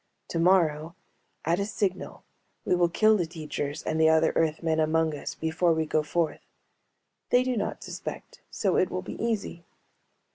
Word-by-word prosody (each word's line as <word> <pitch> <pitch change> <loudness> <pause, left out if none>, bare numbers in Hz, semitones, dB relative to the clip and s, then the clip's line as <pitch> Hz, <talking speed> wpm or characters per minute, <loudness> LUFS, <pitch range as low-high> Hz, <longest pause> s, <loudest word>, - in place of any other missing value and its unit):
Tomorrow, 165 -2 +2 0.5
at 170 +3 +1
a 200 - 0
signal, 200 -4 -3 0.4
we - - +2
will 175 -1 +3
kill 215 +5 +4
the 175 -5 0
teachers 155 -2 -5
and 160 0 -1
the 160 - +6
other 160 0 +3
Earthmen 160 0 +1
among 160 0 +2
us 145 - -6
before 165 +2 +1
we 160 0 0
go 155 0 +1
forth. 155 +2 -1 0.9
They 245 +1 +4
do 255 -1 -1
not 205 -2 -3
suspect, - - -8
so 195 -4 0
it 185 - +2
will 185 - -4
be - - -6
easy. 215 -7 -2
165 Hz, 160 wpm, -27 LUFS, 160-185 Hz, 0.9 s, the